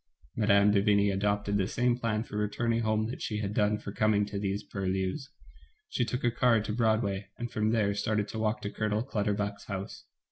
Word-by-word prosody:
Mme. 105 -1 +4
de 100 -1 +3
Vigny 100 -1 +3
adopted 100 +1 0
the 95 -2 +1
same 120 +2 +1
plan 115 -3 -1
for 110 - -10
returning 115 +3 0
home 110 -1 +1
that - - -8
she 105 - -2
had 105 -1 -3
done 105 0 +2
for 105 -1 -7
coming 105 0 +2
to 100 -1 -4
these 100 +1 -2
purlieus. 95 +7 -2 0.6
She 120 - 0
took 125 +2 -3
a 120 - +3
car 120 -1 +3
to 105 0 -3
Broad 110 -1 +2
way, 100 0 -3
and 120 -1 -5
from 110 -2 0
there 110 -3 +2
started 105 +1 0
to 110 - -5
walk 110 +1 -1
to 100 - -3
Colonel 110 0 -1
Clutterbuck's 105 -4 -2
house. 100 -1 -6
105 Hz, 210 wpm, -29 LUFS, 100-110 Hz, 0.6 s, Mme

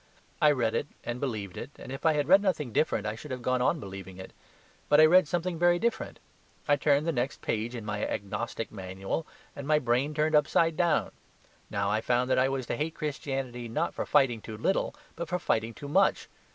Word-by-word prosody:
I 150 - +7
read 120 -6 +1
it 145 - -1 0.2
and 120 +1 -4
believed 110 -9 -4
it, - - -6
and - - -9
if 135 +4 -1
I 160 - +5
had 145 -2 0
read 195 +4 +7
nothing 150 - -1
different, 110 -8 +1
I 105 - -1
should 130 +7 -10
have 125 -2 -5
gone 130 0 +1
on 160 +6 +2
believing 95 -3 -8
it. 95 - -10 0.6
But 150 - +6
I 155 - +9
read 180 +1 +6
something 175 0 -2
very 175 0 +4
different. 230 +3 -2 0.5
I 145 - +5
turned 145 +1 +2
the 165 - +1
next 130 0 -2
page 115 +3 -2
in 115 -3 -6
my 105 0 -3
agnostic 105 +3 -4
manual, 95 - -4 0.3
and 140 -1 -7
my 155 0 +4
brain 130 +2 0
turned 155 +1 +1
up 150 -1 +5
side 165 -1 +2
down. 170 -1 +1 0.6
Now 100 0 -1
I 110 +1 +1
found 125 +2 +1
that - - +4
I 130 +1 +3
was 135 -2 -2
to - - -2
hate 155 +2 -2
Christianity 135 -5 -4
not 155 +9 -1
for - - -4
fighting 135 -6 +3
too 110 0 -8
little, 190 - 0 0.2
but 170 0 -5
for 180 - 0
fighting 115 -9 0
too 145 - -8
much. 145 - +2
135 Hz, 220 wpm, -29 LUFS, 115-155 Hz, 0.6 s, I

